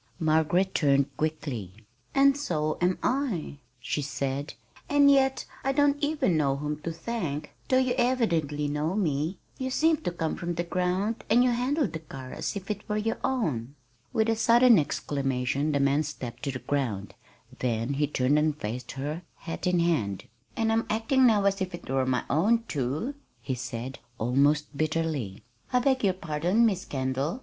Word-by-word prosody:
Margaret 160 +4 +2
turned 140 -2 +2
quickly. 140 - -3 0.4
"And 275 0 +6
so 155 - -1
am 180 +1 +2
I," 245 - -1 0.2
she 130 +4 -2
said, 140 0 -3 0.3
"and 285 -1 +6
yet 270 -1 +3 0.2
I 270 - +1
don't 285 +1 +3
even 290 - +1
know 140 -3 +2
whom 150 +1 -4
to 165 - -3
thank, 165 -5 -4 0.2
though 255 - +4
you 255 -1 +2
evidently 170 - +1
know 150 +5 -1
me. 160 -2 0 0.2
You 260 0 -2
seemed 315 +3 +2
to 175 - +1
come 165 -2 -2
from 175 -1 -3
the 170 - -1
ground, 185 +5 -1
and 235 +3 +5
you 250 - +3
handled 265 +5 0
the 160 - -3
car 135 -5 -9
as - - -3
if 200 +1 -4
it 205 0 -6
were 210 - 0
your 225 +1 -1
own." 150 - -1 0.4
With 220 0 +1
a 225 - +2
sudden 230 0 +6
exclamation 140 -1 -1
the 140 - +1
man 140 +2 +3
stepped 135 -5 -6
to 140 - 0
the 130 - -4
ground; 125 -6 -2 0.5
then 120 +1 -1
he 145 +1 +1
turned 140 +1 +2
and 150 -1 +1
faced 115 +4 -5
her, 145 +5 -4
hat 165 +2 -5
in 180 0 +3
hand. 110 - 0 0.3
"And 225 -1 +2
I'm 225 0 +1
acting 250 +4 +3
now 210 -3 +4
as 195 0 +2
if 185 -1 -2
it - - -12
were 130 0 0
my 125 -2 +1
own, 220 +10 +2
too," 145 - -2 0.3
he 135 - -3
said, 125 +1 -5 0.2
almost 140 +5 +2
bitterly. 155 -9 -2 0.3
"I 250 - +3
beg 260 0 +2
your 195 -2 +3
pardon, 175 +6 +1
Miss 195 -4 0
Kendall. 135 - -2
160 Hz, 175 wpm, -27 LUFS, 140-225 Hz, 0.5 s, And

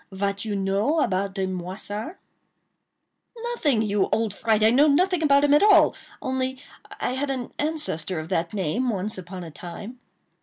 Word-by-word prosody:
Vat 200 +1 -2
you 215 -2 -3
know 200 +10 +1
about 195 +1 -1
de 190 -2 0
Moissart?" 190 - -5 1.4
"Nothing, 280 - +1
you 205 -2 +1
old 225 -3 +1
fright!—I 220 -1 +3
know 280 +5 +5
nothing 355 +4 +3
about 280 -2 +4
him 290 0 +4
at 295 - +6
all; 415 0 +6 0.3
only 260 0 -1 0.4
I - - -1
had 270 +2 -2
an 255 -3 -4
ancestor 295 - -2
of 155 +1 -7
that 170 -3 -1
name, 210 +6 -1
once 205 -1 -2
upon 180 0 -8
a 165 - -9
time." 190 - -9
215 Hz, 160 wpm, -25 LUFS, 190-275 Hz, 1.4 s, at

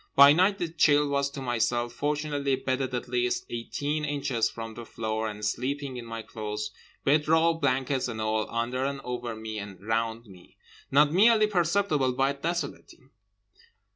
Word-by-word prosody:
By 140 +1 +9
night 190 +5 +3
the 175 - -1
chill 150 -3 +3
was 140 0 +1
to 140 -1 -7
myself—fortunately 135 +4 0
bedded 130 -1 -2
at 125 - -4
least 125 0 0
eighteen 145 +6 -3
inches 140 -6 0
from 115 -1 -7
the 120 - -8
floor 110 -1 -3
and 105 0 -5
sleeping 135 +5 -2
in 120 -1 -6
my 115 -1 -6
clothes; 105 -1 -5 0.3
bed 150 +2 +3
roll, 160 +1 +4
blankets, 135 -3 0
and 115 -2 -5
all, 110 0 -1
under 120 +3 -1
and 140 0 -2
over 120 -2 -4
me 110 0 -6
and 100 -2 -8
around 115 +2 -2
me—not 130 +9 -1
merely 215 +3 +6
perceptible 175 -8 +1
but 135 +2 0
desolating. 170 -5 -4
130 Hz, 155 wpm, -27 LUFS, 115-145 Hz, 0.3 s, By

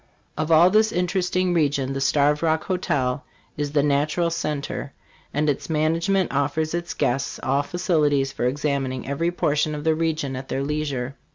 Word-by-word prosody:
Of 155 +2 -2
all 170 +3 +7
this 215 +1 +4
interesting 180 0 0
region 140 -5 +1
the 135 - -3
Starved 145 +2 +2
Rock 160 -1 +1
Hotel 145 -8 -1 0.3
is 145 -1 -3
the 145 -2 +3
natural 150 +4 +1
cen 150 -3 -2
ter; 140 - -5 0.4
and 150 +1 0
its 145 +2 -1
management 165 +5 +1
offers 145 +3 0
its 175 0 -3
guests 135 +3 -1
all 135 +2 +2
facilities 150 -5 +1
for 130 - -3
examining 135 -1 -1
every 140 +5 0
portion 155 -3 0
of 145 - -5
the 160 0 +3
region 155 -4 -1
at 130 +1 -6
their 135 - -2
leisure. 140 -3 -3
150 Hz, 170 wpm, -23 LUFS, 140-165 Hz, 0.4 s, all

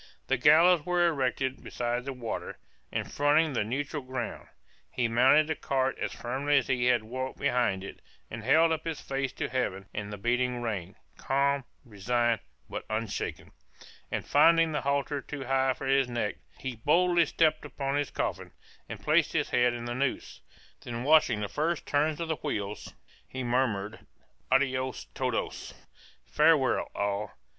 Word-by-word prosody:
The 135 - +1
gallows 155 +5 +6
was 180 +1 0
erected 135 -4 0
beside 120 +1 -3
the 140 - -3
water, 120 -3 -5 0.3
and - - -3
fronting 145 +1 +3
the 115 - +1
neutral 140 +6 -3
ground. 130 0 -5 0.4
He 120 - 0
mounted 130 +6 +5
the 155 - -1
cart 135 -2 0
as - - -2
firmly 135 +4 0
as 135 - +1
he 125 -2 +1
had 125 -3 +3
walked 130 +4 -5
behind 120 -8 +1
it, 100 - -9 0.3
and 110 0 -7
held 160 +7 +4
up 160 -1 -1
his 165 -3 -4
face 135 -1 -3
to - - -3
Heaven 100 -7 -2
and 105 0 -5
the 105 - -5
beating 125 +3 0
rain, 100 -5 -4 0.2
calm, 140 0 +1 0.2
resigned, 120 +2 0 0.3
but - - -5
unshaken; 110 -1 -4 0.6
and - - -2
finding 165 +2 +5
the 150 - -1
halter 140 0 -1
too 140 0 -7
high 130 0 +1
for - - -7
his 135 -1 +3
neck, 120 -3 -2 0.2
he 130 -3 -5
boldly 170 +6 +3
stepped 155 -1 +2
upon 135 -1 -3
his 145 0 0
coffin, - - -3 0.4
and - - -7
placed - - +3
his - - 0
head 125 0 +3
in 120 0 -5
the 120 - -3
noose, 130 +2 -3 0.4
then 120 0 -5
watching 140 -7 +4
the 105 - -1
first 155 - -1
turn 150 +2 +1
of 165 - -3
the 160 -1 -1
wheels, 100 0 -4 0.3
he 130 0 -5
murmured 115 -4 0 0.5
"adios 130 -1 +1
todos," - - -2
[Footnote: - - -20
"Farewell, 150 -3 +3
all." 100 +1 -2
130 Hz, 165 wpm, -29 LUFS, 120-145 Hz, 0.6 s, gallows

